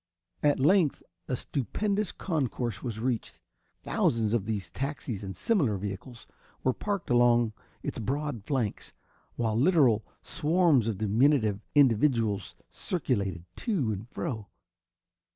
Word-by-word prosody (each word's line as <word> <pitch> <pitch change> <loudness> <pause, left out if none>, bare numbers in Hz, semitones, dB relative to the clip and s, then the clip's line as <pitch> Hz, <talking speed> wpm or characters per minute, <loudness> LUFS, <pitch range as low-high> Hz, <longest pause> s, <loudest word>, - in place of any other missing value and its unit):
At 145 -2 +3
length 155 +2 +3 0.2
a 125 - 0
stupendous 200 - -1
concourse 130 - -2
was 115 -3 -4
reached. 120 0 -2 0.4
Thousands 115 -2 +1
of 115 -5 +1
these 105 -4 -3
taxis 135 -6 -4
and 95 -2 -5
similar 140 - +1
vehicles 100 +5 -7 0.4
were 130 - +3
parked 200 -4 -3
along 120 -2 +4 0.3
its - - -4
broad 140 -1 -2
flanks, 120 -5 -2 0.4
while 110 -2 0
literal 130 - +4 0.2
swarms 160 - +2
of 110 -4 -1
diminutive 110 0 +3 0.2
individuals 115 -7 +3 0.2
circulated 100 - -2
to 170 - 0
and 105 +3 -5
fro. 110 -11 -4
120 Hz, 115 wpm, -29 LUFS, 110-145 Hz, 0.4 s, along